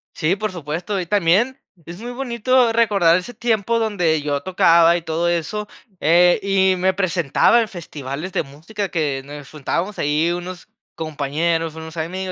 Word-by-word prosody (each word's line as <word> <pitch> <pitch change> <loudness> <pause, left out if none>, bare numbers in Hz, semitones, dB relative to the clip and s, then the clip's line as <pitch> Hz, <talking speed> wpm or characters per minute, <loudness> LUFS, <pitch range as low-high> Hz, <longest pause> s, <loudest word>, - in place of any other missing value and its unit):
Sí, 165 +3 +1
por 215 +1 -3
supuesto, 175 +4 -4
y 180 - -3
también 205 +8 +2 0.3
es 170 +2 -9
muy 240 +1 -6
bonito 245 -1 +1
recordar 200 -7 +4
ese 185 +7 -6
tiempo 230 -1 0
donde 180 -9 +1
yo 145 -1 -2
tocaba 170 -2 +4
y 170 - -7
todo 165 +1 -1
eso, 175 +5 -2 0.3
eh, 175 +4 +4
y 190 -1 +2
me 185 +1 +1
presentaba 185 - +2
en 225 - -2
festivales 155 -2 -7
de 190 - +1
música 165 +9 -6
que 145 -5 -1
nos 145 0 -10
juntábamos 170 +7 -3
ahí 150 +4 +1
unos 175 0 -6 0.3
compañeros, 160 +1 -2
unos 160 0 -9
amigos 185 +4 -3
175 Hz, 160 wpm, -20 LUFS, 160-205 Hz, 0.3 s, recordar